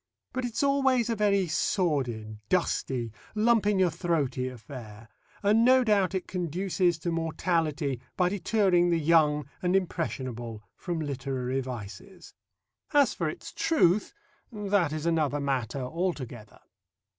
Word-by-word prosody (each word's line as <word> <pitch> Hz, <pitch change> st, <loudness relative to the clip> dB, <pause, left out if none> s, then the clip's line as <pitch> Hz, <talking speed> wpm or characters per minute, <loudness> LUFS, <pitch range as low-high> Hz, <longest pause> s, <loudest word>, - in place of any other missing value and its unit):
But 255 Hz, -1 st, -2 dB
it's 240 Hz, +3 st, -2 dB
always 265 Hz, -4 st, +2 dB
a -, -, 0 dB
very 200 Hz, -2 st, +2 dB
sordid, 135 Hz, -, -1 dB
dusty, 130 Hz, -9 st, 0 dB, 0.2 s
lump 220 Hz, -1 st, +3 dB
in 210 Hz, -1 st, +3 dB
your 185 Hz, -2 st, +3 dB
throaty 150 Hz, -7 st, -1 dB
affair, 115 Hz, -4 st, -10 dB, 0.4 s
and 215 Hz, +3 st, +4 dB
no 255 Hz, +1 st, +6 dB
doubt 200 Hz, -4 st, +2 dB
it 185 Hz, -, -3 dB
conduces 180 Hz, 0 st, 0 dB
to 170 Hz, +2 st, -3 dB
mortality 160 Hz, -4 st, -1 dB, 0.2 s
by 180 Hz, -1 st, +3 dB
deterring 190 Hz, -3 st, +2 dB
the 170 Hz, -, +3 dB
young 150 Hz, -2 st, +3 dB
and 180 Hz, +1 st, +1 dB
impressionable 130 Hz, -, -3 dB
from 175 Hz, -3 st, -4 dB
literary 135 Hz, -2 st, -2 dB
vices. 125 Hz, -, -9 dB, 0.6 s
As 285 Hz, -2 st, +5 dB
for -, -, -1 dB
its -, -, -8 dB
truth, 210 Hz, -, +2 dB, 0.4 s
that 205 Hz, -6 st, +1 dB
is 155 Hz, 0 st, -4 dB
another 155 Hz, -4 st, +1 dB
matter 135 Hz, -3 st, -1 dB
altogether. 130 Hz, -, -4 dB
170 Hz, 130 wpm, -28 LUFS, 135-195 Hz, 0.6 s, no